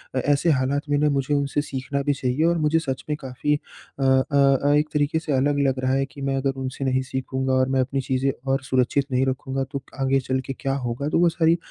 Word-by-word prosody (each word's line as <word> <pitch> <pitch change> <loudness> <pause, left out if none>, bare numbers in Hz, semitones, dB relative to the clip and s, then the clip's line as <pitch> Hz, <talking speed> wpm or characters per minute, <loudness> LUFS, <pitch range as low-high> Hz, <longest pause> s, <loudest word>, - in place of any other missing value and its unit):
अ, - - +2
ऐसे 145 +5 +2
हालात 135 +1 +1
में 145 - +2
ना 150 +1 +3
मुझे 140 0 0
उनसे 140 0 0
सीखना 140 0 -3
भी 145 +1 +1
चाहिए 130 +2 -1
और 170 0 +3
मुझे 155 +1 +2
सच 135 -5 -4
में 150 - +1
काफ़ी 135 +2 -1
अ 145 -1 -9
अ 135 +1 +4
अ, - - +4
एक 150 +1 +1
तरीके 150 +1 +1
से 160 -1 -5
अलग 145 +2 +2
लग 130 -1 0
रहा 130 0 +2
है 135 0 +1
कि 140 +1 -12
मैं 135 0 -1
अगर 135 0 0
उनसे 130 +1 -4
नहीं 130 0 +1
सीखूँगा 130 0 -2
और 130 0 +2
मैं 130 0 +2
अपनी 135 +1 -1
चीज़ें 130 +1 0 0.2
और 135 +1 +1
सुरक्षित 130 +2 +1
नहीं 130 +1 +2
रखूँगा 135 0 -2
तो 140 -2 -4 0.2
आगे 135 0 +3
चल 130 0 -1
के 135 - -4
क्या 135 -1 -1
होगा? 125 +2 -3
तो 165 - +2
वो 175 0 +5
सारी 165 0 +2
135 Hz, 245 wpm, -23 LUFS, 130-145 Hz, 0.2 s, वो